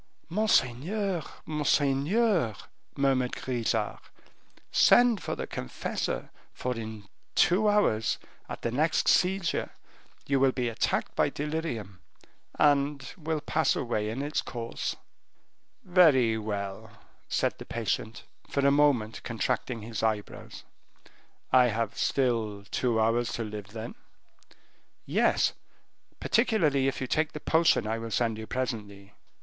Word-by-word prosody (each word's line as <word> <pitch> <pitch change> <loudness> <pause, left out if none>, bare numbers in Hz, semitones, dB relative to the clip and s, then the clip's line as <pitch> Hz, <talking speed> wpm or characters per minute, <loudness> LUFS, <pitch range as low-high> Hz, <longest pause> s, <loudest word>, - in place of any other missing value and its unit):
"Monseigneur, 185 - +1 0.2
monseigneur," 150 - +1 0.4
murmured 135 -3 +1
Grisart, 115 -4 -2 0.7
"send 240 -4 +5
for - - -3
the - - -4
confessor, 60 - -4 0.2
for 125 0 -3
in 110 -2 -6 0.3
two 205 +5 +4
hours, 115 - +2 0.3
at - - -7
the 120 - -1
next 155 +6 +1
seizure, 185 -1 +2 0.6
you 140 -1 +1
will 135 0 +4
be 125 -2 -1
attacked 115 - -1
by - - +3
delirium, 145 - -4 0.6
and 140 -1 +2
will 160 -2 -3
pass 160 +2 +1
away 110 -4 -1
in 125 +6 -3
its 150 +1 -1
course." 115 -2 -4 0.9
"Very 150 -11 +5
well," 100 -3 -4 0.4
said - - 0
the - - -8
patient, 115 -1 -3 0.3
for 140 -1 0
a 140 - +6
moment 140 -7 +2
contracting 115 0 -2
his 110 -1 -5
eyebrows, 110 -2 -3 0.9
"I 125 -1 +6
have 115 -1 -2
still 115 -6 0
two 120 -3 +1
hours 115 +2 +2
to 115 - -2
live 105 -2 -6
then?" 110 +2 -7 1.1
"Yes; - - +2 0.7
particularly 165 - +2
if 135 - -2
you - - 0
take 155 +4 0
the 150 - -5
potion 160 -7 +3
I 110 +1 -2
will 115 0 -5
send 115 -1 0
you 110 - -7
presently." 105 -6 -4
125 Hz, 120 wpm, -28 LUFS, 110-150 Hz, 1.1 s, a